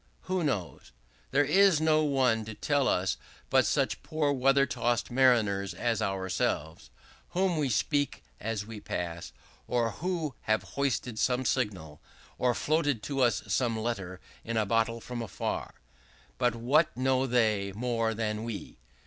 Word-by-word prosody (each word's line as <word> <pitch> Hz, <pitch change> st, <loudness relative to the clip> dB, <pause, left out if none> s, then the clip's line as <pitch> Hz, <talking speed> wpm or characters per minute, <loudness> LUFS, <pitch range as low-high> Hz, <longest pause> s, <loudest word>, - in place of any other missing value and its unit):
Who 185 Hz, -1 st, -1 dB
knows? 100 Hz, -, -3 dB, 0.4 s
There 145 Hz, +2 st, +3 dB
is 190 Hz, +2 st, +5 dB
no 155 Hz, 0 st, +3 dB
one 130 Hz, -6 st, +2 dB
to 110 Hz, 0 st, -7 dB
tell 145 Hz, +2 st, +1 dB
us 90 Hz, -1 st, +1 dB, 0.3 s
but -, -, +4 dB
such -, -, 0 dB
poor 155 Hz, -2 st, 0 dB
weather 135 Hz, +1 st, +4 dB
tossed 120 Hz, -6 st, -1 dB
mariners 110 Hz, -8 st, +3 dB
as 115 Hz, +4 st, 0 dB
ourselves, 95 Hz, -4 st, -2 dB, 0.5 s
whom 185 Hz, -2 st, +2 dB
we 150 Hz, -4 st, 0 dB
speak 145 Hz, +6 st, 0 dB, 0.2 s
as 110 Hz, -2 st, -3 dB
we 110 Hz, -1 st, -8 dB
pass, 85 Hz, -3 st, -5 dB, 0.4 s
or 120 Hz, -2 st, +1 dB
who 165 Hz, -, -3 dB, 0.2 s
have 110 Hz, 0 st, +3 dB
hoisted 125 Hz, -4 st, -2 dB
some 130 Hz, +1 st, +1 dB
signal, 95 Hz, -, -2 dB, 0.4 s
or 125 Hz, -1 st, +2 dB
floated 145 Hz, -7 st, 0 dB
to 135 Hz, -2 st, -2 dB
us 120 Hz, -6 st, +2 dB
some 115 Hz, +3 st, 0 dB
letter 100 Hz, -5 st, -3 dB, 0.2 s
in 115 Hz, 0 st, -3 dB
a 110 Hz, -, +2 dB
bottle 115 Hz, +2 st, +1 dB
from 120 Hz, -2 st, -5 dB
far. -, -, -4 dB, 0.6 s
But 120 Hz, -2 st, +2 dB
what 135 Hz, +6 st, +2 dB
know 130 Hz, +1 st, +2 dB
they 110 Hz, -5 st, +2 dB
more 115 Hz, +1 st, -1 dB
than 110 Hz, -1 st, -2 dB
we? 115 Hz, -, -6 dB
120 Hz, 150 wpm, -29 LUFS, 105-140 Hz, 0.6 s, is